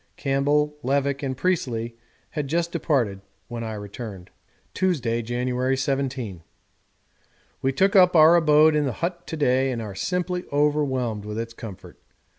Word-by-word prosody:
Campbell, 145 +2 +1
Levick, 140 +1 0
and 130 -2 -3
Priestley 120 -9 -1 0.4
had 150 -3 -3
just 170 +3 0
departed 115 - 0 0.3
when 120 -1 -5
I 110 -1 -4
returned._10_ 105 -2 -8 0.4
Tuesday, 130 -11 0
January 125 +2 -1
17. 130 -8 -2 1.2
We 135 - +1
took 190 +9 +2
up 180 -2 +6
our 160 +1 +8
abode 155 -1 +5
in 150 -1 +2
the 130 - -1
hut 175 0 -5
to 160 - -4
day 130 -2 +2
and 120 - -3
are 105 -3 -5
simply 180 - -2
overwhelmed 140 -7 0
with 105 +1 -6
its 115 0 -4
comfort. 110 -5 -10
135 Hz, 145 wpm, -24 LUFS, 115-150 Hz, 1.2 s, our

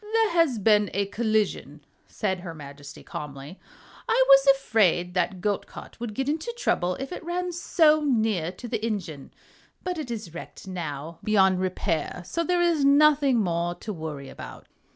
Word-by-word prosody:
"There 450 -3 +3
has 330 -8 +3
been 210 0 +3
a 200 0 +1
collision," 205 - -1 0.2
said 190 -3 -2
her 175 -2 -8
Majesty, 145 -1 -11
calmly. 145 +4 -8 0.5
"I - - +4
was 275 0 +7
afraid 190 -9 +1
that 180 0 -1
goat 205 0 -1
cart - - -12
would 230 -3 -5
get 270 +3 -2
into 315 +10 -2
trouble 180 - 0
if 270 +4 -6
it 360 - -6
ran 355 +1 -2
so 315 -3 +3
near 220 - +1
to 240 - -9
the 225 -2 -3
engine. 185 -11 -4 0.5
But 360 -2 -3
it 295 - -5
is 215 -8 -6
wrecked 170 - -10
now, 165 -3 -6
beyond 190 -3 +3
repair, 180 -2 -2
so 335 - -2
there 355 +1 +1
is 335 -4 +2
nothing 280 -3 +5
more 175 -2 -1
to 215 - -6
worry 155 -5 -6
about." - - -10
210 Hz, 170 wpm, -26 LUFS, 175-280 Hz, 0.5 s, was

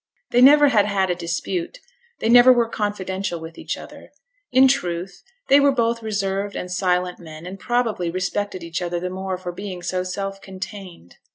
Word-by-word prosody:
They 245 - +4
never 290 +2 +8
had 210 -5 +3
had 190 -2 +1
a - - 0
dispute, 260 - -4 0.4
they - - 0
never 245 +2 +8
were 240 -2 +3
confidential 190 -4 -3
with 160 0 -9
each - - -5
other; - - -12 0.4
in 260 +1 +6
truth, 180 -8 -2 0.3
they 275 - +6
were 280 0 +5
both 235 -3 0
reserved 200 -2 -2
and 180 - -5
silent 180 -1 0
men, 160 -1 -11
and, 190 +2 -8
probably, 230 -8 0
respected 185 +1 -3
each 170 +1 -4
other 175 0 -2
the 180 +1 -4
more 190 0 -4
for 180 -1 -6
being 185 -1 -7
so 185 +1 -1
self 195 +2 -4
contained. 190 - -9
195 Hz, 180 wpm, -22 LUFS, 180-230 Hz, 0.4 s, never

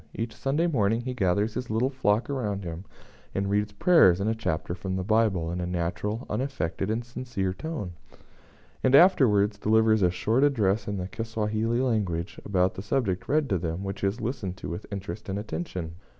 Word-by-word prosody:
Each 115 -1 -4
Sunday 145 +5 0
morning 115 -8 +1
he 125 +1 -4
gathers 105 -1 +1
his 125 -1 -4
little 115 +5 +1
flock 115 -4 +1
around 105 -8 -2
him, 85 +2 -6 0.5
and 95 0 0
reads 105 +1 +1
prayers 100 - +5
and 100 - -1
a 110 - +2
chapter 85 -7 -2
from 95 +1 -4
the 95 - -2
Bible, 100 -5 +2
in 90 +1 -3
a 90 - -2
natural, 90 +6 -2
unaffected, 105 -6 -2
and 115 +2 -1
sincere 120 -6 -3
tone; 130 - -5 0.9
and 130 +1 +5
afterwards 110 - +5
delivers 110 0 +3
a 90 - +5
short 110 +9 +1
address 110 -7 +2
in 100 -1 -2
the 90 -1 -3
Kisawahili 115 +2 -1
language, 95 -8 -1
about 95 -2 +1
the - - -6
subject 100 -3 -1
read 150 +1 +2
to 95 -4 +1
them, 85 +2 -3
which 100 0 -5
is 100 +4 0
listened 105 -6 -3
to 70 - -6
with 85 +6 -7
interest 100 +2 -6
and 95 - -2
attention. 100 - -4
105 Hz, 185 wpm, -27 LUFS, 95-120 Hz, 0.9 s, prayers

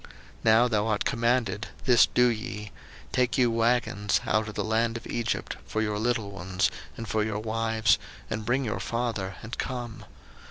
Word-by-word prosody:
01:045:019 - - -15 0.4
Now 115 +2 +6
thou 110 -2 +1
art 105 -2 0
commanded, 115 -3 +1 0.2
this 125 -3 +6
do 125 - +3
ye; 105 -3 -2 0.4
take 125 -2 +1
you 125 -2 +4
wagons 115 -3 +2
out 110 0 +1
of 105 - -9
the - - -1
land 115 +1 +1
of 115 - -11
Egypt 115 -1 -2
for 110 - -2
your 105 -1 0
little 115 -3 0
ones, 95 0 0 0.3
and 115 - -6
for 105 +2 +1
your 105 -1 -2
wives, 110 +1 +1 0.3
and 110 - -3
bring 130 +4 +1
your 105 - -2
father, 115 -5 -2
and 110 +2 -7
come. 120 -3 -4
110 Hz, 175 wpm, -27 LUFS, 105-120 Hz, 0.4 s, Now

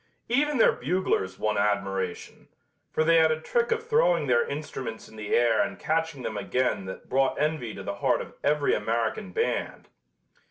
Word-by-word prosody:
Even 290 +4 +2
their 225 - +6
buglers 145 - -1
won 105 -1 0
admiration, 95 -3 -2 0.4
for 155 - +1
they 165 +1 +5
had 160 -1 +5
a 155 - 0
trick 470 - 0
of 460 0 -1
throwing 180 - +3
their 120 -3 +3
instruments 135 -6 -6
in - - -15
the 105 -1 -1
air 120 -2 +4
and - - -2
catching 160 -4 -1
them 110 - -3
again 125 -1 0
that 95 - -8
brought 135 0 +1
envy 150 -6 -1
to - - -7
the - - -3
heart - - +2
of - - -7
every 150 0 +2
American 110 -3 -1
band. - - -2
135 Hz, 175 wpm, -27 LUFS, 110-160 Hz, 0.4 s, their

